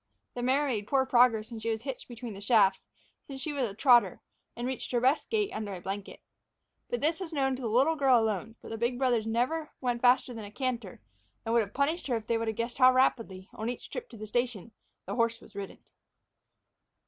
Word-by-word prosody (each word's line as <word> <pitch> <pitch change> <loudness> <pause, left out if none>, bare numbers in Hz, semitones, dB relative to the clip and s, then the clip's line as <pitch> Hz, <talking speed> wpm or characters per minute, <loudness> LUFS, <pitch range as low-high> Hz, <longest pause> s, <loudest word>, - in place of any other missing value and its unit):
The 245 - -5
mare 265 +4 +2
made 215 -7 -2
poor 265 +1 +2
progress 240 -3 +3
when 230 - -6
she 225 +1 -3
was 220 0 -2
hitched 270 -2 -6
between 240 -2 -7
shafts, 205 -3 +4 0.5
since 270 -1 -7
she 300 +2 -4
was 280 - -2
not 235 -5 0
a - - -17
trotter, 240 - +5 0.4
and 240 - -4
reached 260 -1 -4
her 240 - +3
best 260 +5 +2
gait 425 -3 0
under 210 -2 -4
a - - -7
blanket. 195 +2 -6 0.7
But 485 - -2
this 320 +3 +1
was 365 -3 -6
known 270 -3 +1
to 260 - -8
the 240 - -2
little 270 +9 +3
girl 270 -5 +4
alone, 220 0 -2
for - - -13
the 225 - -6
big 240 +1 0
brothers 245 -4 +1
never 255 +8 0
went 245 -2 -1
faster 250 0 +4
than 225 -2 -7
a - - -9
canter, 240 - -4 0.4
and 225 - -1
would 235 - +5
have 205 -2 -6
punished 295 +5 0
her 250 - +1
if 220 - -8
they 235 - -1
had 225 -1 -2
guessed 235 +3 -4
how 255 0 +8
rapidly, 225 -7 +1
on 220 +2 -4
each 245 - -7
trip - - -6
to 230 - -12
the 215 - -7
station, 235 -1 -2 0.3
the - - -4
horse 230 -1 +1
was - - -17
ridden. 200 -1 -7
240 Hz, 230 wpm, -29 LUFS, 220-265 Hz, 0.7 s, how